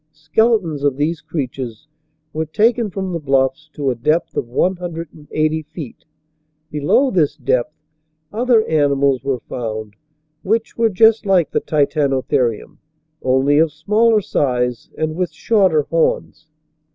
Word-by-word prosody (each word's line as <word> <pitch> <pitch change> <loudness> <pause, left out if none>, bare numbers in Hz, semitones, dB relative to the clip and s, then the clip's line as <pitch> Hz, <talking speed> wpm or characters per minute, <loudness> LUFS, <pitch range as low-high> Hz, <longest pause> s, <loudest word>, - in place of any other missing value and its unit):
Skeletons 160 -1 +1
of 140 -2 +1
these 155 +3 -1
crea 155 -4 -3
tures 125 -1 -8 0.5
were 160 0 -2
taken 225 +6 +2
from 190 -1 -4
the 170 - -2
bluffs 135 +1 0
to 140 -3 -1
a - - -3
depth 155 +8 0
of - - -2
one 180 +9 +1
hundred 170 -2 -6
and 150 -2 -16
eighty 155 +1 0
feet. 155 -3 -10 0.7
Below 150 - +2
this 155 -6 +1
depth, 130 +2 -1 0.6
other 235 0 +3
animals 140 -3 +2
were 135 -3 -2
found 110 -3 -6 0.5
which 225 +3 -1
were 230 -1 +2
just 220 +2 +4
like 185 -4 +3
the - - 0
Titano 140 -3 +1
therium, 120 -4 -1 0.4
only 130 +3 +3
of 160 -1 +3
smaller 210 +8 +2
size 125 - -1
and 155 0 -2
with 180 0 -2
shorter 190 -9 +2
horns. 160 0 -1
155 Hz, 145 wpm, -19 LUFS, 135-185 Hz, 0.7 s, just